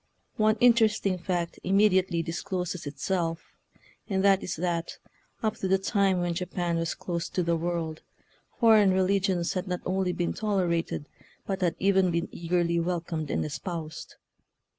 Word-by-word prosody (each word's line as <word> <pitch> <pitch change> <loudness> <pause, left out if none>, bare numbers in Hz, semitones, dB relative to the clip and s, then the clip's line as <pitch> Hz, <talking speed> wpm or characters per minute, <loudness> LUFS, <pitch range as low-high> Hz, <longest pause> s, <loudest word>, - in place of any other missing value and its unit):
One 215 0 +3
interesting 220 -6 +3
fact 175 -1 -2
immediately 190 -3 +3
discloses 180 -1 -4
it 145 0 -7
self, 165 0 -2 0.6
and 190 -1 0
that 195 -1 +5
is 180 - -3
that 170 0 -2 0.5
up 220 -1 0
to 190 - -2
the 190 +1 +4
time 195 -2 +1
when 175 -1 0
Japan 175 -1 -2
was 165 -1 -1
closed 170 -1 -4
to 180 - +2
the 170 0 +1
world 165 -1 -3 0.6
foreign 215 -5 +6
religions 190 -2 +1
had 185 0 -3
not 180 -1 -2
only 185 0 0
been 175 -1 -1
tolerated, 175 -7 -1 0.4
but 195 -1 -3
had 175 -2 +1
even 190 -1 +3
been 170 0 -1
eagerly 170 0 0
welcomed 165 -3 -2
and - - 0
espoused. 160 0 -6
180 Hz, 150 wpm, -27 LUFS, 170-195 Hz, 0.6 s, foreign